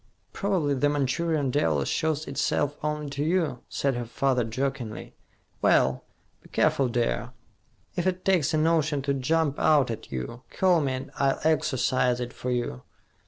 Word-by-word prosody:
"Probably 185 -8 0
the 145 +2 +2
Manchurian 145 +1 0
devil 80 - +1
shows 155 -1 0
itself 145 +1 0
only 150 0 -2
to 140 +1 -2
you," 160 -6 0
said 140 -1 0
her 120 -1 -3
father 125 +1 +1
jokingly. 120 -1 -4 0.5
"Well, 65 -1 +3 0.4
be - - -18
careful, 135 - +2
dear. 120 -1 -1 0.6
If 175 +1 0
it 185 0 -1
takes 175 -6 +3
a 155 - +1
notion 155 -3 +2
to 140 0 +1
jump 145 +2 0
out 145 -6 +4
at 115 0 -7
you, 65 - -5
call 180 -3 +3
me 135 -2 0
and 135 +2 -6
I'll 135 -1 +2
exorcise 130 -5 +2
it 120 0 -4
for 125 - -5
you." 120 - -2
140 Hz, 160 wpm, -26 LUFS, 125-155 Hz, 0.6 s, out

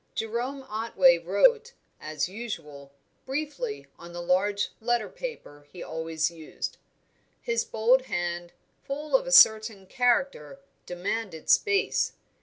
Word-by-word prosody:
Jerome 240 +5 -3
Otway 260 - +3
wrote, 475 -1 +2 0.3
as 155 0 -3
usual, 165 -10 -8 0.4
briefly, 310 - -4
on 170 0 -11
the 175 - -6
large 200 +3 +1
letter 235 -1 0
paper 145 - -8
he 180 - -8
always 160 0 -2
used; 160 -2 -7 0.6
his 475 -1 -1
bold 245 +4 +2
hand, 175 0 -3 0.3
full 295 - -2
of - - +2
a - - -3
certain 220 - +6
character, 245 - 0 0.3
demanded 180 -1 -3
space. 410 -1 +2
220 Hz, 115 wpm, -27 LUFS, 175-275 Hz, 0.6 s, certain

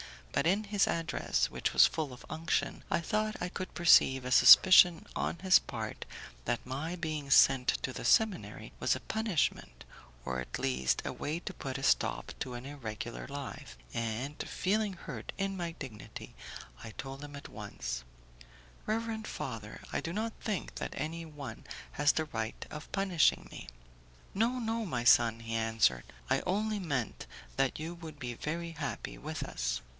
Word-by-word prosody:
But - - +1
in 200 +5 +3
his 205 -1 +2
address 160 - 0
(which - - -1
was - - +8
full 155 -4 -1
of 125 - -12
unction) 160 +1 -1
I - - +1
thought 215 +4 0
I 180 - -1
could 185 +1 -6
perceive 135 -6 +6
a 125 - -3
suspicion 180 +4 +9
on - - -1
his 190 +1 +6
part - - -6 0.4
that 120 - -1
my 145 +7 -3
being 155 -4 -4
sent 135 -2 +6 0.2
to - - -1
the - - -6
seminary 220 -5 +2
was - - +2
a - - -6
punishment, 160 - -1 0.4
or 65 0 -2
at 65 - -5
least 65 -1 0
a - - -2
way 155 +3 -3
to 190 - -6
put 135 -5 -5
a 135 - -7
stop - - +1
to 125 - -4
an 120 +1 -7
irregular 110 - -6
life, - - -7 0.2
and, 115 +6 -3
feeling 205 +1 0
hurt 135 -10 -7
in 195 0 -1
my 170 -2 -3
dignity, 125 - -9 0.5
I 110 - -8
told 135 +4 -7
him 145 0 -8
at 140 - -9
once, 100 - -5 0.8
"Reverend 220 0 -2
father, 115 -5 -6
I - - 0
do 165 - -4
not 220 +3 -2
think 210 -4 -3
that - - -5
any 165 +3 -3
one 150 -3 -8 0.3
has 145 0 +3
the 160 - 0
right 115 -6 -4
of 150 0 -8
punishing 190 -6 +2
me." - - -9 0.7
"No, 230 +5 +1
no, 230 -1 -1
my 125 -10 -2
son," 115 -1 +5
he 115 0 -5
answered, 110 - +2 0.2
"I - - +3
only 210 +3 0
meant 135 - -3 0.3
that 135 +1 +1
you 160 +2 -4
would 160 -3 -9
be 125 -3 -4
very 165 +7 -4
happy 150 -3 -5
with 155 +1 -4
us." - - -2
150 Hz, 170 wpm, -32 LUFS, 120-185 Hz, 0.8 s, suspicion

